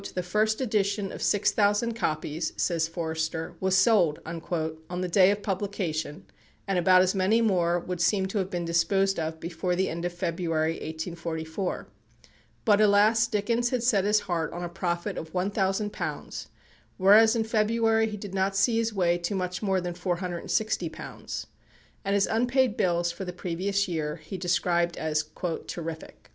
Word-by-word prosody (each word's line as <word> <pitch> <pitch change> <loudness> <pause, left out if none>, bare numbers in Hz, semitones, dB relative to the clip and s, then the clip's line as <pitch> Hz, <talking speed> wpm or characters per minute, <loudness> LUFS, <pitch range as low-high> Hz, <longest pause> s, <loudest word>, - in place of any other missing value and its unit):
"The 180 - -1
first 215 +5 +1
edition 205 -4 0
of - - -8
six 205 - +2
thousand 210 +3 +2
copies," 155 -5 -2
says 165 -3 +1
Forster, 160 0 -3
"was 190 0 +2
sold" 190 -7 +4
on 160 +1 -4
the 185 - -1
day 185 +1 +5
of 205 0 -1
publication, 185 -6 -3 0.4
and 195 -2 +1
about 185 +1 +6
as 185 - +1
many 195 +4 +3
more 175 -6 +2
would 180 0 -5
seem 195 +1 +2
to 205 - -1
have 190 -1 -2
been 175 -2 -3
disposed 195 +4 +2
of 160 0 -3
before 175 +2 -2
the 190 +1 0
end 170 +1 -4
of 175 - -1
February, 165 -2 -1
1844. 165 +2 -4 0.8
But, 210 -1 +5
alas, 215 +2 +5
Dickens 230 +3 0
had 250 -2 -1
set 210 -6 +3
his 210 +1 +3
heart 165 -3 -2
on 175 - -5
a 175 - -3
profit 175 +2 -2
of 160 0 -9
£1,000, 195 +2 -2 0.5
whereas 215 +4 +6
in 225 - +1
February 225 0 +2
he 210 - -5
did 200 -1 -8
not 195 0 0
see 225 +4 +3
his 230 0 +1
way 175 -2 +2
to 175 +4 -2
much 180 -1 -3
more 195 -3 +1
than 175 -1 -4
£460, 180 +4 -3 0.6
and 200 0 0
his 200 - +3
unpaid 245 +1 +1
bills 175 -6 +1
for 170 +3 -7
the 180 - -4
previous 190 +3 -1
year 155 -4 -2
he 160 +5 -9
described 175 -1 0
as 155 -1 -1 0.4
"terrific." 165 -2 -7
185 Hz, 165 wpm, -27 LUFS, 170-205 Hz, 0.8 s, about